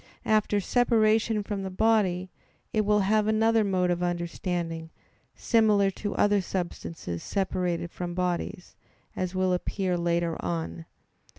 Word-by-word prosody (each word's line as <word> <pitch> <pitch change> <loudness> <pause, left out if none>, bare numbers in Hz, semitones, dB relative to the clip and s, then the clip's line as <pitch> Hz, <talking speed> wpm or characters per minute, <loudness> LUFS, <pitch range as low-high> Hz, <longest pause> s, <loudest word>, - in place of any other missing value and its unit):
After 215 -1 +2
separation 220 -1 +2
from 200 -1 -4
the 190 - -4
body 190 -3 +1 0.4
it 215 - +3
will 210 0 +3
have 210 +2 +2
another 220 +1 +3
mode 185 -3 +1
of 175 0 -1
understanding, 170 -1 -3 0.5
similar 210 -4 +3
to 205 +1 -5
other 205 -1 +3
substances 170 - -4
separated 180 -3 -2
from 175 -1 -5
bodies, 180 +1 -3 0.4
as 185 0 -3
will 185 0 +2
appear 180 0 -1
later 170 -1 0
on 85 -2 -2
(Q. 80 0 -10
185 Hz, 130 wpm, -27 LUFS, 175-210 Hz, 0.5 s, it